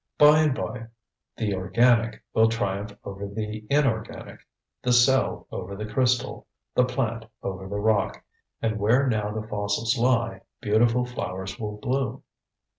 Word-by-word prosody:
By 150 Hz, +1 st, +7 dB
and 150 Hz, -4 st, +3 dB
by 115 Hz, -4 st, -5 dB, 0.5 s
the 105 Hz, -3 st, -1 dB
organic 115 Hz, +5 st, +2 dB
will 110 Hz, 0 st, +5 dB
triumph 100 Hz, -2 st, -2 dB
over 100 Hz, 0 st, -6 dB
the 105 Hz, +1 st, -5 dB
inorganic, 135 Hz, -7 st, 0 dB, 0.4 s
the 125 Hz, -, +2 dB
cell 120 Hz, -8 st, +3 dB
over 95 Hz, +2 st, -5 dB
the 105 Hz, +2 st, -5 dB
crystal, 125 Hz, +3 st, 0 dB, 0.3 s
the 125 Hz, -, +4 dB
plant 115 Hz, -3 st, -2 dB, 0.2 s
over 95 Hz, 0 st, -4 dB
the 100 Hz, +1 st, -3 dB
rock, 105 Hz, -1 st, +1 dB, 0.4 s
and 110 Hz, -1 st, 0 dB
where 120 Hz, +7 st, +3 dB
now 110 Hz, -5 st, 0 dB
the 110 Hz, 0 st, -5 dB
fossils 105 Hz, +3 st, 0 dB
lie 120 Hz, -1 st, +1 dB, 0.2 s
beautiful 115 Hz, +4 st, +2 dB
flowers 95 Hz, -4 st, -5 dB
will 105 Hz, -2 st, -4 dB
bloom. 130 Hz, +3 st, -2 dB
110 Hz, 140 wpm, -26 LUFS, 105-125 Hz, 0.5 s, By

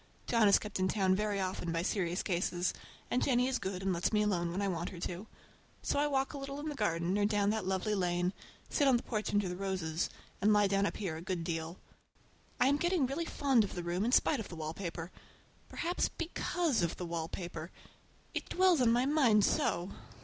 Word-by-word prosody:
John 230 Hz, -3 st, +4 dB
is 200 Hz, -, +7 dB
kept 210 Hz, -2 st, -5 dB
in 185 Hz, -, +2 dB
town 190 Hz, -1 st, +2 dB
very 205 Hz, +1 st, 0 dB
often 185 Hz, -2 st, -2 dB
by 165 Hz, 0 st, -1 dB
serious 180 Hz, -2 st, -1 dB
cases, 180 Hz, -1 st, 0 dB, 0.4 s
and 250 Hz, -, +2 dB
Jennie 250 Hz, -1 st, +3 dB
is 260 Hz, -1 st, 0 dB
good 190 Hz, 0 st, -4 dB
and 190 Hz, -1 st, +1 dB
lets 170 Hz, 0 st, 0 dB
me 210 Hz, -1 st, +3 dB
alone 175 Hz, -5 st, 0 dB
when 180 Hz, -, -3 dB
I 200 Hz, -, 0 dB
want 175 Hz, -2 st, -2 dB
her 180 Hz, -, -9 dB
to. 180 Hz, +5 st, -4 dB, 0.6 s
So -, -, +1 dB
I 295 Hz, -, +3 dB
walk 270 Hz, -1 st, 0 dB
a 285 Hz, -, -5 dB
little 275 Hz, +1 st, -5 dB
in 305 Hz, +1 st, -4 dB
the -, -, -3 dB
garden 175 Hz, -, 0 dB
or 205 Hz, -, +3 dB
down 205 Hz, -1 st, +2 dB
that 215 Hz, -4 st, -2 dB
lovely 190 Hz, +3 st, 0 dB
lane, 180 Hz, -1 st, 0 dB, 0.3 s
sit 285 Hz, -, +2 dB
on 260 Hz, -2 st, +5 dB
the -, -, -6 dB
porch 215 Hz, -2 st, -2 dB
under 205 Hz, -2 st, +2 dB
the 180 Hz, -, -3 dB
roses, 180 Hz, -4 st, -2 dB, 0.3 s
and 210 Hz, +2 st, +4 dB
lie 210 Hz, -1 st, +5 dB
down 195 Hz, 0 st, +2 dB
up -, -, -4 dB
here 175 Hz, -6 st, -3 dB
a -, -, -7 dB
good 180 Hz, -1 st, -3 dB
deal. 165 Hz, +1 st, -3 dB, 0.8 s
I'm 275 Hz, +3 st, +4 dB
getting 345 Hz, -2 st, +2 dB
really 280 Hz, +6 st, -2 dB
fond 270 Hz, -8 st, +2 dB
of 200 Hz, -, -5 dB
the 175 Hz, -, -4 dB
room 175 Hz, +3 st, -1 dB
in 235 Hz, -, +1 dB
spite 275 Hz, +1 st, +4 dB
of 220 Hz, -, -6 dB
the 170 Hz, -, -7 dB
wallpaper. 165 Hz, +2 st, -5 dB, 0.6 s
Perhaps 350 Hz, +2 st, -1 dB
because 335 Hz, -, -1 dB
of 170 Hz, -1 st, -1 dB
the 180 Hz, -, -4 dB
wallpaper. 170 Hz, 0 st, -5 dB, 0.6 s
It -, -, -4 dB
dwells 365 Hz, -5 st, +4 dB
in 235 Hz, -2 st, +5 dB
my 245 Hz, +2 st, +3 dB
mind 260 Hz, -8 st, +4 dB
so! 175 Hz, +3 st, 0 dB
200 Hz, 220 wpm, -33 LUFS, 175-245 Hz, 0.8 s, is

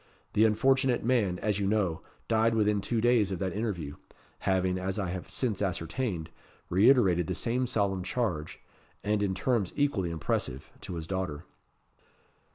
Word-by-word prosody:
The 110 Hz, -, +5 dB
unfortunate 130 Hz, +2 st, +2 dB
man, 110 Hz, -8 st, +2 dB
as 105 Hz, +1 st, -1 dB
you 100 Hz, -, 0 dB
know, 95 Hz, -6 st, +1 dB, 0.3 s
died 115 Hz, 0 st, +3 dB
within 105 Hz, -2 st, +2 dB
two 115 Hz, +2 st, -1 dB
days 115 Hz, -4 st, +3 dB
of 95 Hz, -, -2 dB
that 95 Hz, 0 st, -2 dB
interview, 90 Hz, -10 st, -3 dB, 0.4 s
having, 95 Hz, -1 st, +1 dB
as 95 Hz, +2 st, -2 dB
I 95 Hz, -4 st, -1 dB
have 90 Hz, -1 st, -6 dB
since 115 Hz, -7 st, -1 dB
ascertained, 90 Hz, -1 st, -2 dB, 0.4 s
reiterated 95 Hz, -4 st, +5 dB
the -, -, -2 dB
same 125 Hz, +2 st, 0 dB
solemn 100 Hz, -5 st, 0 dB
charge, 90 Hz, -7 st, -2 dB, 0.4 s
and 105 Hz, 0 st, +1 dB
in 95 Hz, -2 st, 0 dB
terms 105 Hz, -2 st, 0 dB
equally 140 Hz, -12 st, +1 dB
impressive, 75 Hz, -4 st, -3 dB
to 90 Hz, -, -6 dB
his 80 Hz, -1 st, -5 dB
daughter." 90 Hz, -4 st, -3 dB
100 Hz, 155 wpm, -29 LUFS, 90-115 Hz, 0.4 s, The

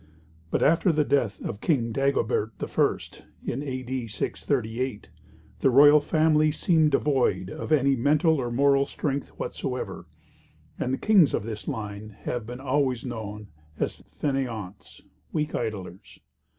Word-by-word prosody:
But -, -, +1 dB
after 165 Hz, +4 st, +4 dB
the 155 Hz, -1 st, +2 dB
death 135 Hz, -7 st, 0 dB
of 105 Hz, -, -5 dB
King 120 Hz, -9 st, +1 dB
Dagobert 115 Hz, -4 st, 0 dB
I., -, -, +1 dB, 0.5 s
in 130 Hz, -, -2 dB
A.D. 130 Hz, -3 st, -4 dB
638, 110 Hz, +3 st, -3 dB, 0.5 s
the 135 Hz, -, +3 dB
royal 145 Hz, +4 st, +7 dB
family 155 Hz, 0 st, +3 dB
seemed 160 Hz, 0 st, +3 dB
devoid 135 Hz, -9 st, +1 dB
of -, -, -6 dB
any 140 Hz, -2 st, +4 dB
mental 150 Hz, +5 st, +3 dB
or 120 Hz, -, -2 dB
moral 140 Hz, +2 st, +3 dB
strength 140 Hz, -2 st, -3 dB
whatsoever, -, -, -4 dB, 0.7 s
and 125 Hz, -, -1 dB
the 130 Hz, -, 0 dB
kings 195 Hz, -9 st, +4 dB
of -, -, -2 dB
this 110 Hz, -1 st, -6 dB
line 105 Hz, -5 st, -5 dB
have 120 Hz, -3 st, -4 dB
been 125 Hz, +1 st, -7 dB
always 130 Hz, -2 st, 0 dB
known 105 Hz, -4 st, -6 dB, 0.3 s
as -, -, -3 dB, 0.2 s
fainéants 120 Hz, -9 st, -4 dB, 0.3 s
weak 150 Hz, -1 st, -2 dB
idlers. 100 Hz, -5 st, -5 dB
130 Hz, 135 wpm, -26 LUFS, 110-145 Hz, 0.7 s, royal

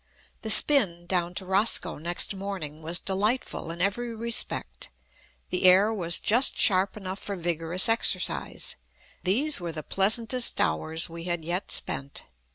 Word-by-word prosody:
The 220 Hz, -, -6 dB
spin 205 Hz, -, +6 dB
down 175 Hz, -1 st, -2 dB
to 190 Hz, -, -6 dB
Roscoe 190 Hz, -3 st, +1 dB
next 175 Hz, +5 st, -3 dB
morning 190 Hz, -6 st, -7 dB
was 165 Hz, +2 st, +1 dB
delightful 205 Hz, 0 st, -3 dB
in 170 Hz, +2 st, -4 dB
every 230 Hz, +4 st, -3 dB
respect. 230 Hz, +1 st, -1 dB, 0.6 s
The 180 Hz, -, -1 dB
air 195 Hz, +4 st, +5 dB
was 175 Hz, -5 st, +1 dB
just 240 Hz, +5 st, +1 dB
sharp 190 Hz, 0 st, +2 dB
enough 190 Hz, -1 st, -7 dB
for 200 Hz, -, -6 dB
vigorous 170 Hz, 0 st, 0 dB
exercise. 225 Hz, 0 st, -1 dB, 0.5 s
These 245 Hz, +7 st, +1 dB
were 170 Hz, -1 st, -5 dB
the 155 Hz, -1 st, -8 dB
pleasantest 225 Hz, -, +2 dB
hours 155 Hz, -, -1 dB
we 170 Hz, 0 st, -10 dB
had 175 Hz, -3 st, -4 dB
yet 175 Hz, +4 st, -4 dB
spent. 140 Hz, +1 st, -3 dB
185 Hz, 145 wpm, -25 LUFS, 170-215 Hz, 0.6 s, spin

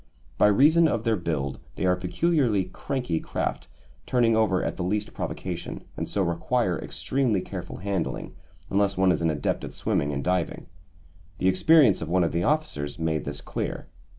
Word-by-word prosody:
By -, -, +6 dB
reason 155 Hz, +11 st, +5 dB
of 115 Hz, -7 st, -1 dB
their 115 Hz, -1 st, +2 dB
build, 70 Hz, -7 st, -2 dB, 0.2 s
they -, -, -2 dB
are 90 Hz, 0 st, +4 dB
peculiarly 110 Hz, -, +1 dB
"cranky" 125 Hz, -, -3 dB
craft, -, -, -3 dB, 0.4 s
turning 120 Hz, -3 st, +3 dB
over 110 Hz, -4 st, +2 dB
at -, -, -2 dB
the -, -, -3 dB
least 105 Hz, +3 st, -1 dB
provocation, 90 Hz, -2 st, -5 dB
and -, -, -4 dB
so 100 Hz, -, +1 dB
require 90 Hz, +4 st, 0 dB
extremely 125 Hz, -7 st, 0 dB
careful -, -, -6 dB
handling, 95 Hz, -2 st, -3 dB, 0.4 s
unless 100 Hz, 0 st, +2 dB
one 95 Hz, -1 st, +4 dB
is 85 Hz, -, 0 dB
an 85 Hz, -, +2 dB
adept 75 Hz, -2 st, -1 dB
at -, -, -7 dB
swimming 70 Hz, -, 0 dB
and 70 Hz, -1 st, -3 dB
diving. 90 Hz, -1 st, -1 dB, 0.7 s
The 95 Hz, -, +2 dB
experience 105 Hz, -, +5 dB
of 80 Hz, -, -4 dB
one 90 Hz, +1 st, +3 dB
of 85 Hz, -, 0 dB
the 85 Hz, -, 0 dB
officers 85 Hz, -, -1 dB
made 80 Hz, -1 st, -1 dB
this 70 Hz, 0 st, -4 dB
clear. -, -, -4 dB
95 Hz, 175 wpm, -26 LUFS, 85-115 Hz, 0.7 s, By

